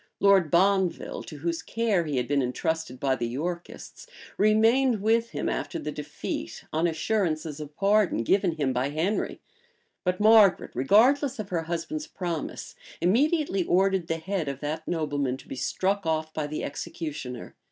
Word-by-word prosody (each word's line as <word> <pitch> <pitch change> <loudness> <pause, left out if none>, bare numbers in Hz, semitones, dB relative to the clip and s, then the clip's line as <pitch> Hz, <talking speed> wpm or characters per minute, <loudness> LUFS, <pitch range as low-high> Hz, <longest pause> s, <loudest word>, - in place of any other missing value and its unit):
Lord 195 -5 +5
Bonville, 190 +1 +1
to 150 - -9
whose 165 +3 -2
care 220 -7 0
he 145 -3 -2
had 125 -1 0
been 145 -1 +2
intrusted 155 +1 -2
by 135 -1 +1
the 120 - -2
Yorkists, 170 +8 -6 0.3
remained 225 +3 +3
with 230 +1 +2
him - - -3
after - - -2
the - - -4
defeat, - - -6
on 160 +2 +2
assurances 160 -4 -1
of 150 -1 -8
pardon 200 - +2
given 190 - +2
him 140 -5 -1
by 125 +2 0
Henry: 165 +8 -1 0.6
but 180 0 0
Margaret, 215 -2 +5
regardless 245 - +4
of 210 -3 -5
her 165 -3 -2
husband's 175 - -4
promise, 175 -4 -5 0.3
immediately 265 - +2
ordered 190 0 +2
the 165 - -1
head 180 -1 -3
of 140 -1 -4
that 155 +2 -4
nobleman 145 -6 -1
to - - -16
be - - -6
struck 195 +9 -1
off 160 -1 -1
by 155 -2 -2
the 150 - -4
executioner. 140 -4 -6
170 Hz, 160 wpm, -27 LUFS, 150-200 Hz, 0.6 s, Lord